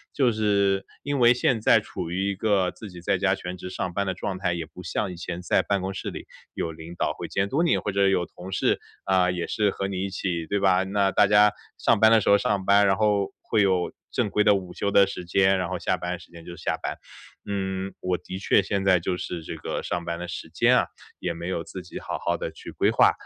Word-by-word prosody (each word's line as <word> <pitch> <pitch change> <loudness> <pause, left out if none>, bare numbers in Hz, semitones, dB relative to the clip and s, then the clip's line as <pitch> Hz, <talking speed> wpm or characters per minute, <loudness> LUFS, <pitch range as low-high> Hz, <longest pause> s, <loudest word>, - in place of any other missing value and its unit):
就 130 -4 +3
是 100 -3 +1 0.2
因 145 -1 -1
为 120 0 +7
现 125 -1 +1
在 110 - +5
处 90 -5 -6
于 95 +3 -1
一 - - -4
个 95 -3 +1
自 110 - -10
己 90 -2 -11
在 90 - +1
家 95 0 +2
全 90 -1 -6
职 90 - -7
上 90 -1 -4
班 100 +2 -1
的 95 - 0
状 95 +1 -4
态， 90 -2 0
也 85 -1 -3
不 85 +3 -12
像 90 +3 -2
以 - - -7
前 85 0 -5
在 90 - +2
办 100 -2 -1
公 95 +1 -3
室 - - -4
里 - - -8 0.3
有 80 - -3
领 80 +2 -10
导 - - 0
会 - - -6
监 95 +1 -1
督 145 +8 +1
你， 170 - +3
或 105 - -2
者 100 0 +3
有 95 -2 +2
同 90 +2 -10
事， - - +1 0.2
啊， 95 -1 +3
也 90 -1 -2
是 105 -1 +1
和 95 0 -3
你 95 -1 -2
一 - - -3
起， 85 -3 -3
对 100 - 0
吧？ 95 -1 +3
那 100 0 +1
大 105 - +4
家 105 +1 +6 0.3
上 - - +2
班 110 +1 +7
的 115 -1 +6
时 - - 0
候 100 - +7
上 100 -2 -1
班， 100 0 +5
然 95 - +4
后 105 -1 +1
会 110 - +1
有 95 -3 +2 0.2
正 - - 0
规 105 - +2
的 105 -1 +5
午 90 -2 -5
休 100 - -1
的 100 0 +6
时 95 - -6
间， 95 +2 +3
然 90 - -2
后 - - -2
下 - - 0
班 90 0 -4
时 - - -16
间 85 -1 -12
就 85 - -8
是 85 - -13
下 - - 0
班。 - - -3 0.5
嗯， 95 -1 -3
我 90 0 0
的 95 - -7
确 100 - +3
现 100 -2 -2
在 95 -2 +5
就 90 +2 -2
是 90 -1 -5
这 - - -6
个 - - -4
上 85 - -3
班 85 0 -3
的 90 - -5
时 85 - -6
间 - - +4
啊， - - +3 0.3
也 - - -2
没 85 +1 -6
有 90 -3 -2
自 95 - -8
己 90 - -8
好 - - -5
好 - - +1
地 - - -4
去 - - -10
规 - - +2
划， - - +5
95 Hz, 285 characters per minute, -25 LUFS, 90-100 Hz, 0.5 s, 为